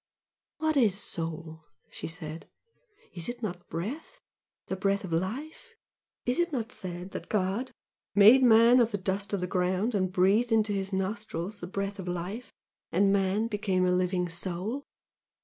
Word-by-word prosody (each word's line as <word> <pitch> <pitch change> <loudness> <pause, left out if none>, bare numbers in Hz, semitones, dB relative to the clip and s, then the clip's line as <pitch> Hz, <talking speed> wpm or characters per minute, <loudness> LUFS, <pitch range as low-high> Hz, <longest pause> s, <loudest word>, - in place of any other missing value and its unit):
"What 315 0 0
IS 215 -7 +4
soul?" 160 -3 -4 0.3
she - - -6
said 160 -1 -7 0.7
"Is 175 +1 -5
it 240 0 -6
not 175 -4 -5
breath? 250 - -5 0.5
the 190 - -3
breath 200 +2 0
of 185 - -6
life? 290 - -4 0.5
Is 245 +6 +1
it 345 0 +1
not 245 -4 -3
said 180 -2 -6
that - - -7
God 210 +6 0 0.4
'made 215 +6 +8
man 235 0 +7
of 235 -2 +4
the 205 - -1
dust 195 +1 -2
of 200 -3 -1
the - - 0
ground 185 +5 0
and 185 -3 0
breathed 195 +6 +3
into 220 -2 +3
his 195 0 -2
nostrils 195 0 -3
the 175 - -5
breath 200 +2 -3
of 185 - -6
life 185 +6 -4 0.4
and 195 +3 +3
man 200 +2 +2
became 200 -4 0
a 180 - +3
living 180 0 +1
soul!' 185 +10 -3
195 Hz, 165 wpm, -29 LUFS, 180-225 Hz, 0.7 s, made